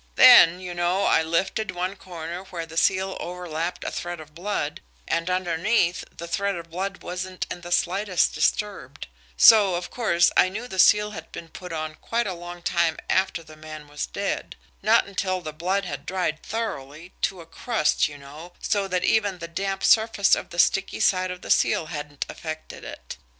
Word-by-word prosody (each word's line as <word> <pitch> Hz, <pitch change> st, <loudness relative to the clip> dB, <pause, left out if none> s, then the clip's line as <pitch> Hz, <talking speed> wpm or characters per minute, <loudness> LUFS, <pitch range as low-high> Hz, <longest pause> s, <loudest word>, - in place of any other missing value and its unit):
Then, 170 Hz, +2 st, +8 dB
you 180 Hz, -1 st, -6 dB
know, 175 Hz, +3 st, +1 dB
I -, -, +4 dB
lifted 170 Hz, +6 st, -1 dB
one 185 Hz, +2 st, -3 dB
corner 170 Hz, -1 st, -7 dB
where 170 Hz, -3 st, -6 dB
the 165 Hz, 0 st, -12 dB
seal 190 Hz, +3 st, +2 dB
overlapped 175 Hz, -1 st, -4 dB
a -, -, -3 dB
thread 175 Hz, -1 st, -5 dB
of 155 Hz, -1 st, -12 dB
blood, 170 Hz, -3 st, -3 dB, 0.3 s
and, 170 Hz, +1 st, -1 dB
underneath, 180 Hz, +1 st, +1 dB
the 170 Hz, -, -7 dB
thread 200 Hz, +3 st, -1 dB
of 170 Hz, -1 st, -9 dB
blood 190 Hz, +2 st, -4 dB
wasn't 185 Hz, +1 st, -4 dB
in 175 Hz, -, -5 dB
the 175 Hz, 0 st, -9 dB
slightest 185 Hz, +1 st, +1 dB
disturbed; 190 Hz, -10 st, -1 dB, 0.3 s
so, 205 Hz, -, +7 dB
of 175 Hz, 0 st, -5 dB
course, 175 Hz, -8 st, +3 dB
I 185 Hz, -, +5 dB
knew 220 Hz, +6 st, -6 dB
the 190 Hz, -5 st, -6 dB
seal 210 Hz, +2 st, +5 dB
had 160 Hz, -5 st, -9 dB
been 165 Hz, -, -9 dB
put 180 Hz, +2 st, -9 dB
on 155 Hz, -1 st, -4 dB
quite 235 Hz, +1 st, -1 dB
a 190 Hz, -, -2 dB
long 175 Hz, 0 st, -9 dB
time 170 Hz, -2 st, +1 dB
after 190 Hz, -3 st, +1 dB
the 155 Hz, -1 st, -14 dB
man 155 Hz, -1 st, -10 dB
was 145 Hz, 0 st, -4 dB
dead -, -, -3 dB, 0.3 s
not -, -, +4 dB
until 185 Hz, -1 st, -2 dB
the 155 Hz, -3 st, -7 dB
blood 185 Hz, +5 st, -1 dB
had -, -, -6 dB
dried 180 Hz, -4 st, -1 dB
thoroughly, 170 Hz, -7 st, -5 dB
to 185 Hz, -, -1 dB
a 165 Hz, -, -10 dB
crust, 165 Hz, -2 st, 0 dB
you 145 Hz, -1 st, -10 dB
know, 150 Hz, +5 st, -12 dB
so 200 Hz, -2 st, 0 dB
that 180 Hz, -1 st, -1 dB
even 205 Hz, -3 st, +2 dB
the 170 Hz, -1 st, -7 dB
damp 195 Hz, +3 st, -3 dB
surface 220 Hz, -3 st, +4 dB
of -, -, +1 dB
the 175 Hz, -, -10 dB
sticky 195 Hz, +2 st, +2 dB
side 185 Hz, -1 st, +2 dB
of 180 Hz, 0 st, -6 dB
the -, -, -3 dB
seal -, -, +3 dB
hadn't 145 Hz, -1 st, -5 dB
affected 155 Hz, -1 st, -7 dB
it. -, -, -9 dB
175 Hz, 190 wpm, -24 LUFS, 165-190 Hz, 0.3 s, Then